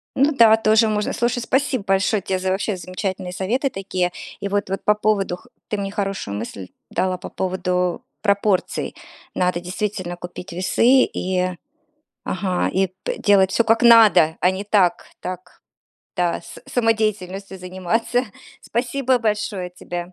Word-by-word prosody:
Ну 280 Hz, +3 st, +4 dB
да, 225 Hz, -3 st, +6 dB
тоже 220 Hz, 0 st, +4 dB
можно. 210 Hz, -1 st, -1 dB
Слушай, 240 Hz, +1 st, 0 dB
спасибо 260 Hz, -2 st, 0 dB
большое 195 Hz, +2 st, +2 dB
тебе 185 Hz, 0 st, -2 dB
за 185 Hz, 0 st, -1 dB
вообще 195 Hz, +2 st, -1 dB
замечательные 185 Hz, 0 st, -4 dB
советы 240 Hz, +10 st, 0 dB
такие. 185 Hz, -5 st, -2 dB, 0.3 s
И 200 Hz, -, -3 dB
вот 200 Hz, -1 st, -1 dB
вот 195 Hz, -, -3 dB
по 210 Hz, -, +4 dB
поводу 205 Hz, -4 st, 0 dB
х -, -, -21 dB, 0.2 s
ты 210 Hz, -, -2 dB
мне 195 Hz, -1 st, -3 dB
хорошую 195 Hz, -, -3 dB
мысль 100 Hz, -4 st, -7 dB, 0.2 s
дала 185 Hz, -1 st, 0 dB
по 180 Hz, -, -8 dB
поводу 180 Hz, +1 st, -1 dB, 0.2 s
пропорций. 200 Hz, -2 st, 0 dB, 0.4 s
Надо 180 Hz, -1 st, +1 dB
действительно 185 Hz, 0 st, -4 dB
купить 175 Hz, +1 st, -8 dB
весы 230 Hz, +9 st, +4 dB
и, 185 Hz, 0 st, -1 dB, 0.8 s
ага, 185 Hz, -1 st, -1 dB
и 190 Hz, +1 st, +2 dB, 0.2 s
п -, -, -3 dB
делать 195 Hz, -2 st, +4 dB
всё 235 Hz, -, +2 dB
как 225 Hz, +1 st, +3 dB
надо, 215 Hz, -9 st, +7 dB
а 180 Hz, -, +4 dB
не 190 Hz, +2 st, -4 dB
так 195 Hz, -4 st, +2 dB
так, 180 Hz, 0 st, -7 dB, 0.6 s
да, 175 Hz, -2 st, 0 dB
са -, -, -11 dB
самодеятельностью 205 Hz, -5 st, -1 dB
заниматься. 190 Hz, +7 st, -1 dB, 0.4 s
Спасибо 255 Hz, +2 st, 0 dB
большое 210 Hz, -5 st, -2 dB
тебе. 175 Hz, 0 st, -7 dB
195 Hz, 150 wpm, -21 LUFS, 180-220 Hz, 0.8 s, надо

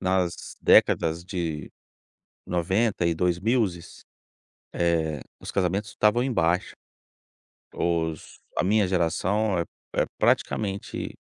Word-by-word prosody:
Nas 90 Hz, -2 st, -1 dB
décadas 80 Hz, +1 st, +4 dB
de 85 Hz, -5 st, -4 dB, 0.8 s
90 95 Hz, +3 st, +1 dB
e 85 Hz, -, +2 dB
dois 90 Hz, +1 st, +1 dB
mil, 100 Hz, -5 st, -1 dB, 0.7 s
eh, 80 Hz, -4 st, 0 dB, 0.2 s
os -, -, -6 dB
casamentos 100 Hz, +3 st, 0 dB
estavam 105 Hz, +4 st, +2 dB
em 130 Hz, -, -1 dB
baixa. 85 Hz, -2 st, +1 dB, 1.0 s
Os 80 Hz, -2 st, -2 dB, 0.2 s
a -, -, +2 dB
minha 105 Hz, 0 st, +3 dB
geração 95 Hz, +3 st, +1 dB
é 85 Hz, -, 0 dB, 0.3 s
é -, -, +3 dB
praticamente 100 Hz, -2 st, 0 dB
90 Hz, 105 wpm, -26 LUFS, 85-100 Hz, 1.0 s, décadas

